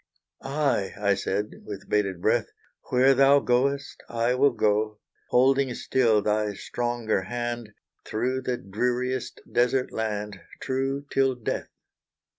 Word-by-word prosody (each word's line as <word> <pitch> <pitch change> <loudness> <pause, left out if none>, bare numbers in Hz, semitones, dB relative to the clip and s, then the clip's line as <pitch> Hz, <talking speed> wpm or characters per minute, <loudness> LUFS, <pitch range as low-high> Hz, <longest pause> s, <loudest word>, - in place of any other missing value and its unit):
"Aye," 135 -8 0
I 100 -1 +3
said, 100 +2 -3
with 100 -2 -8
bated 95 -4 0
breath, - - +2 0.4
"Where 130 +2 +5
thou 135 +1 +6
goest, 140 +3 0
I 115 +1 +1
will 135 +3 +4
go; 105 -3 +1 0.3
Holding 135 +1 +3
still 115 -5 +2
thy 105 -1 0
stronger 120 -2 -1
hand, 120 +1 -4 0.3
Through 125 +4 -1
the 125 -1 -2
dreariest 125 +6 -2
desert 125 +3 +2
land, 105 -2 -3 0.2
True, 135 +2 -2
till 135 -1 +2
death." 120 - -3
120 Hz, 120 wpm, -26 LUFS, 105-130 Hz, 0.4 s, thou